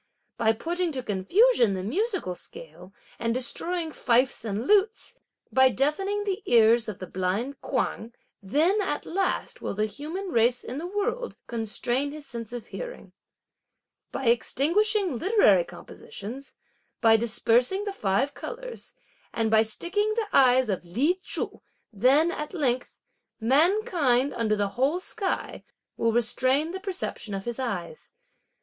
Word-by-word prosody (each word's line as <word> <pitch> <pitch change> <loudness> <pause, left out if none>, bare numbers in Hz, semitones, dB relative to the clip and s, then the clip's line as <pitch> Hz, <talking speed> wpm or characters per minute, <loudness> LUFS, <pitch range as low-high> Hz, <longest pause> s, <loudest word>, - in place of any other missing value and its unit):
By 225 -1 +2
putting 345 +8 -2
to 260 -2 -3
confusion 225 - +3
the 185 - -4
musical 370 - -1
scale, 175 +1 -12 0.3
and 230 0 0
destroying 325 +6 -2
fifes 250 -3 +1
and 220 +1 -3
lutes, 420 - +1 0.3
by 260 0 +6
deafening 385 +11 0
the 400 0 -2
ears 230 0 +5
of 205 - -6
the 185 - -7
blind 190 +10 -2
Kuang, 235 -3 -2 0.3
then, 315 - +2
at 370 -7 -2
last, 380 +1 -2
will - - -3
the 215 +1 +1
human 310 - -6
race 240 -3 +2
in 255 +4 -5
the 340 - -4
world 455 +6 -2
constrain 240 +4 -2
his 300 0 -9
sense 235 -4 -7
of 245 -2 -6
hearing. - - -8 1.0
By 270 - -4
extinguishing 340 - +2
literary 430 +5 +4
compositions, 275 - -10 0.4
by 225 -1 +6
dispersing 240 - +2
the 405 - -3
five 215 - 0
colours - - -7 0.4
and 225 -1 -1
by 220 0 +6
sticking 410 - -1
the 445 -3 -2
eyes 255 -1 +5
of 190 -4 -2
Li 270 - 0
Chu, 405 - -3 0.3
then, 270 - +4
at 300 +1 -5
length, 255 -6 -1 0.4
mankind 285 - +2
under 220 -2 0
the 205 -1 0
whole 270 - 0
sky, 380 +1 -3 0.3
will 230 - +1
restrain 255 +6 +1
the 380 - -5
perception 370 - -5
of 195 - -5
his 240 +1 -4
eyes. 265 - -5
265 Hz, 140 wpm, -26 LUFS, 230-375 Hz, 1.0 s, by